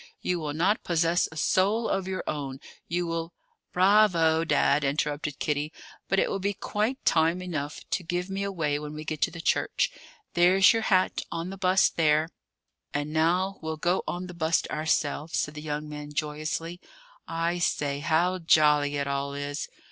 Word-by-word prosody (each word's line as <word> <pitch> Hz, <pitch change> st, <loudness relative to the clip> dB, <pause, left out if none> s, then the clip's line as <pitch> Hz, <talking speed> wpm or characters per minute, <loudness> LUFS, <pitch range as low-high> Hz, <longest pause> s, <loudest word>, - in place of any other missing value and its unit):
You 180 Hz, -1 st, -1 dB
will 150 Hz, -2 st, -3 dB
not 190 Hz, +7 st, +1 dB
possess 170 Hz, 0 st, +1 dB
a 160 Hz, -, -10 dB
soul 205 Hz, +8 st, +2 dB
of 190 Hz, -1 st, -1 dB
your 190 Hz, 0 st, -3 dB
own; 140 Hz, -3 st, -4 dB, 0.3 s
you 175 Hz, +1 st, -1 dB
will 165 Hz, 0 st, -3 dB, 0.2 s
" -, -, -53 dB
"Bravo, 180 Hz, -4 st, +4 dB
Dad!" 150 Hz, -2 st, +2 dB
interrupted 145 Hz, +1 st, -1 dB
Kitty. 150 Hz, 0 st, -1 dB, 0.4 s
"But 195 Hz, -, +2 dB
it -, -, +3 dB
will 195 Hz, -, -2 dB
be 200 Hz, +1 st, -1 dB
quite 215 Hz, +6 st, -2 dB
time 165 Hz, +2 st, +3 dB
enough 155 Hz, -5 st, -4 dB
to -, -, 0 dB
give 175 Hz, +1 st, -2 dB
me 195 Hz, 0 st, -4 dB
away 165 Hz, -7 st, -1 dB
when 150 Hz, 0 st, -7 dB
we 155 Hz, 0 st, -7 dB
get 155 Hz, -1 st, -4 dB
to -, -, +3 dB
the 165 Hz, -1 st, -9 dB
church. -, -, +1 dB, 0.4 s
There's 185 Hz, +4 st, +6 dB
your 225 Hz, -, 0 dB
hat, 185 Hz, -4 st, +2 dB
on 170 Hz, +2 st, -4 dB
the -, -, -6 dB
bust 185 Hz, -1 st, +3 dB
there." 155 Hz, 0 st, +3 dB, 0.7 s
"And 145 Hz, +1 st, -2 dB
now 180 Hz, +5 st, +1 dB
we'll 160 Hz, -1 st, -4 dB
go 175 Hz, +4 st, +1 dB
on 180 Hz, +1 st, -3 dB
the 180 Hz, -, -8 dB
bust 160 Hz, -1 st, +1 dB
ourselves," 155 Hz, 0 st, -1 dB
said 150 Hz, -, -1 dB
the 150 Hz, -, -7 dB
young 150 Hz, 0 st, -4 dB
man 150 Hz, 0 st, -7 dB
joyously. 155 Hz, +3 st, -3 dB, 0.5 s
"I 170 Hz, +1 st, -1 dB
say, 145 Hz, -4 st, 0 dB
how 170 Hz, +5 st, +1 dB
jolly 150 Hz, -3 st, +4 dB
it 140 Hz, -, -1 dB
all 140 Hz, 0 st, -2 dB
is! 145 Hz, +1 st, -4 dB
165 Hz, 180 wpm, -27 LUFS, 150-180 Hz, 0.7 s, There's